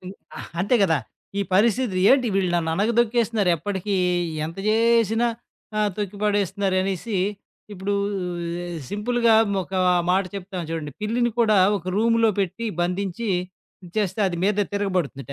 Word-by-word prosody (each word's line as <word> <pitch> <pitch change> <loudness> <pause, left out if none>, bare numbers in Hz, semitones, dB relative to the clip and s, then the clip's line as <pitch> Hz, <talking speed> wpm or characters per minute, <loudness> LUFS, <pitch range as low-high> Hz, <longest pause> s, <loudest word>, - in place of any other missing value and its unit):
హ్మ్. 185 - -8 0.2
ఆ - - -6 0.2
అంతే 205 +7 +1
గదా! 165 -5 +3 0.4
ఈ - - +2
పరిస్థితి 220 0 +2
ఏంటి? 260 -2 +4
వీళ్ళు 190 -2 +1
నన్ననగదొక్కేస్తున్నారు? 215 +4 +1
ఎప్పటికీ 195 +4 -3 0.5
ఎంత 165 - -8
జేసినా? 230 +1 +3 0.5
ఆ 215 - +2 0.2
తొక్కిపడేస్తున్నారనేసి. 200 -1 -1 0.6
ఇప్పుడు 200 +1 -2 1.0
సింపుల్‌గా 230 +2 +2 0.3
ఒక 190 +2 -9 0.4
మాట 190 +1 +3
చెప్తాం 185 -1 -6
చూడండి. 155 -3 -4
పిల్లిని 240 +2 0
కూడా 215 -2 +4 0.2
ఒక 180 - -15
రూమ్‌లో 230 0 +3
పెట్టి 200 +5 -2 0.2
బంధించి 190 +5 -2 0.7
చేస్తే 205 -1 0
అది 175 - -4
మీద 210 0 +1 0.2
తిరగబడుతుందిట. 175 - -2
205 Hz, 115 wpm, -23 LUFS, 185-225 Hz, 1.0 s, ఏంటి